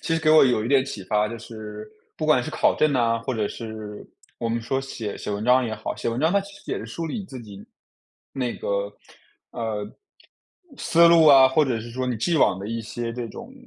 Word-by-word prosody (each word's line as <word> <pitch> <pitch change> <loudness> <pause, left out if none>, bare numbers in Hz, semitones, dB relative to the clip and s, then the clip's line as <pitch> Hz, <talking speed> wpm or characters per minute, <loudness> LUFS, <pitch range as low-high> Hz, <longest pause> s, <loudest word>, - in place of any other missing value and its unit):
其 165 - 0
实 165 - 0
给 155 -1 +3
我 155 - +8
有 120 -5 +2
一 115 - -2
点 135 -1 +4
启 100 -8 -7
发， 105 +1 +1
就 115 - -6
是 110 -2 -9 0.3
不 - - -3
管 - - +4
是 - - -5
考 - - +2
证 155 -2 +3
呐， 115 -3 +2
或 120 +2 -3
者 105 -2 0
是 110 -2 -8 0.3
我 115 - -2
们 115 +1 -1
说 135 +4 -1
写 115 -6 -6
写 - - -5
文 100 +1 -3
章 125 +1 +4
也 110 - -3
好， - - -5
写 - - -3
文 115 +1 -2
章 160 +4 +2
它 200 - +3
其 200 0 -11
实 - - -7
也 - - -2
是 - - -7
梳 165 -1 -5
理 190 - -4
你 195 - -7
自 135 -8 -9
己 100 -2 -11 0.7
那 125 -3 -3
个 100 0 -2 0.6
呃， 110 -3 -3 0.9
思 170 0 +5
路 165 -1 +6
啊， 135 -3 +9
或 150 +3 +3
者 125 -5 -1
是 120 +1 -9
说 130 +1 -3
你 125 -2 -1
既 165 +9 0
往 95 - +3
的 100 - -6
一 115 0 -3
些 115 +1 -5
这 120 -1 -5
种， 235 +2 -10
120 Hz, 265 characters per minute, -24 LUFS, 110-140 Hz, 0.9 s, 啊